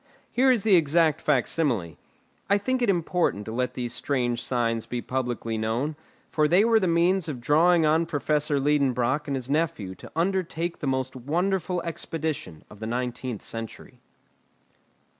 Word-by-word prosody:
Here 260 +2 +3
is 245 -5 +3
the 215 -3 +5
exact 160 -1 +3
facsimile. 115 - 0 0.5
I 200 - +5
think 255 +5 -1
it 240 - +2
important 170 - 0
to 110 - -6
let 125 +2 -2
these 120 -2 -3
strange 120 -4 -1
signs 115 -3 -1
be 125 - -3
publicly 120 -3 -3
known, 120 +8 -1 0.3
for 155 -1 +2
they 180 +7 +4
were 230 -1 +4
the 190 - 0
means 170 +1 +2
of 135 -5 -4
drawing 160 +6 +4
on 160 +2 +2
Professor 150 -2 0
Liedenbrock 140 -1 +1
and 140 - -1
his 130 -2 -4
nephew 145 - -1
to - - -13
undertake 170 -1 -1
the 145 - -3
most 130 -1 -1
wonderful 175 +6 -1
expedition 155 - -4
of 105 - -15
the 110 - -5
nineteenth 125 -1 -3
century. 115 -1 -8
150 Hz, 160 wpm, -26 LUFS, 120-170 Hz, 0.5 s, the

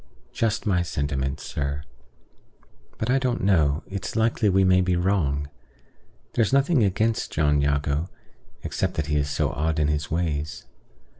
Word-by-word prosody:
"Just 115 -2 0
my 95 -4 +2
sentiments, 70 -4 -2
sir. 70 +1 -3 1.1
But 110 +3 -1
I 135 - +3
don't 125 -5 -1
know: 80 -6 +2
it's 100 -1 -5
likely 110 -1 +2
we 95 0 +4
may 95 0 +4
be 90 -1 +1
wrong. 85 -6 0 0.9
There's 115 -3 +2
nothing 140 -1 +3
against 110 +3 0
John 75 -1 +2
Jago, 70 +3 0 0.5
except - - -2
that 80 - -1
he 75 0 0
is 70 0 0
so - - 0
odd 80 +1 -1
in 75 -1 +2
his 75 -1 -1
ways. 75 -3 -2
80 Hz, 150 wpm, -25 LUFS, 75-100 Hz, 1.1 s, we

